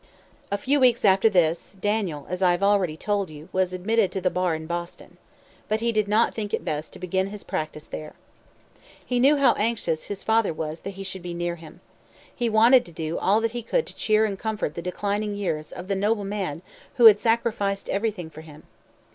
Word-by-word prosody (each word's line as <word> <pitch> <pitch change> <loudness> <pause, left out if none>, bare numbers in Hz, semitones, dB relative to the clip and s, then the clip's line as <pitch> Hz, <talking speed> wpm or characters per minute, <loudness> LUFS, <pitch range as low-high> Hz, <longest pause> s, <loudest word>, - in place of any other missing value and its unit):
A 200 - +1
few 280 +7 +1
weeks 245 -4 +4
after 195 +3 +5
this, 170 -1 +1
Daniel, 200 -8 -1
as 180 +1 -4
I 180 -2 +4
have 175 +3 -2
already 195 -6 +2
told 200 0 -1
you, 155 +3 -12
was 185 -1 +1
admitted 200 +3 +1
to 195 - -1
the 185 -1 0
bar 180 -2 0
in 160 0 -6
Boston. 170 +1 -6 0.5
But 215 +1 +1
he 235 +1 0
did 215 -2 +1
not 215 +3 +2
think 210 -2 -2
it - - -8
best 155 0 -3
to - - -9
begin 190 +1 -1
his 205 0 -8
practice 155 0 -4
there. 155 -1 -8 0.9
He 250 -1 0
knew 275 +4 +5
how 280 - +5
anxious 210 -8 -1
his 200 -1 -6
father 220 -5 +2
was 155 +1 -5
that 195 -1 -7
he 195 - -5
should 190 -1 -5
be 175 0 -6
near 175 0 -2
him. 160 -1 -14 0.5
He 240 -1 0
wanted 230 +4 +6
to 170 - -12
do 160 0 -4
all 210 +3 +3
that 225 0 0
he 240 0 -4
could 475 - 0
to - - -9
cheer 215 0 +2
and 200 -3 -3
comfort 215 -8 -2
the 170 - -5
declining 205 +3 -2
years 165 -7 -3
of 180 - -8
the 195 +1 -1
noble 205 +1 0
man 190 -5 -4 0.3
who 240 - +5
had 210 -2 +9
sacrificed 215 -4 0
everything 195 -5 -2
for 155 - -10
him. 155 -1 -14
195 Hz, 215 wpm, -25 LUFS, 170-220 Hz, 0.9 s, had